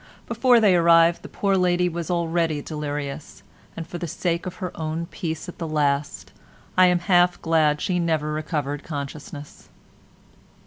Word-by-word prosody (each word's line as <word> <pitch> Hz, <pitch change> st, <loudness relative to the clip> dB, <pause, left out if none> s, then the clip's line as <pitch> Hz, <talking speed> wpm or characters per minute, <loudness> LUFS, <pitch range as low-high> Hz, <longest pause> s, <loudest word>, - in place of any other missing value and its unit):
Before 240 Hz, +1 st, +4 dB
they 205 Hz, -5 st, +4 dB
arrived 170 Hz, 0 st, +5 dB
the -, -, -10 dB
poor 195 Hz, -1 st, 0 dB
lady 180 Hz, -1 st, +2 dB
was 170 Hz, 0 st, -4 dB
already 165 Hz, -3 st, 0 dB
delirious, 145 Hz, -1 st, -6 dB, 0.3 s
and 165 Hz, -, -5 dB
for 175 Hz, -, -7 dB
the 170 Hz, -, -4 dB
sake 170 Hz, +2 st, -2 dB
of 185 Hz, -, -6 dB
her 180 Hz, -2 st, -5 dB
own 160 Hz, +1 st, -3 dB
peace 165 Hz, -2 st, -5 dB
at 180 Hz, -, -10 dB
the 165 Hz, -, -3 dB
last 145 Hz, -2 st, -1 dB, 0.4 s
I 185 Hz, 0 st, +6 dB
am 180 Hz, 0 st, +3 dB
half 180 Hz, -1 st, +3 dB
glad 155 Hz, -2 st, +2 dB
she 180 Hz, -2 st, 0 dB
never 160 Hz, -3 st, 0 dB
recovered 150 Hz, -2 st, -3 dB
consciousness. 145 Hz, -1 st, -8 dB
165 Hz, 160 wpm, -23 LUFS, 150-180 Hz, 0.4 s, I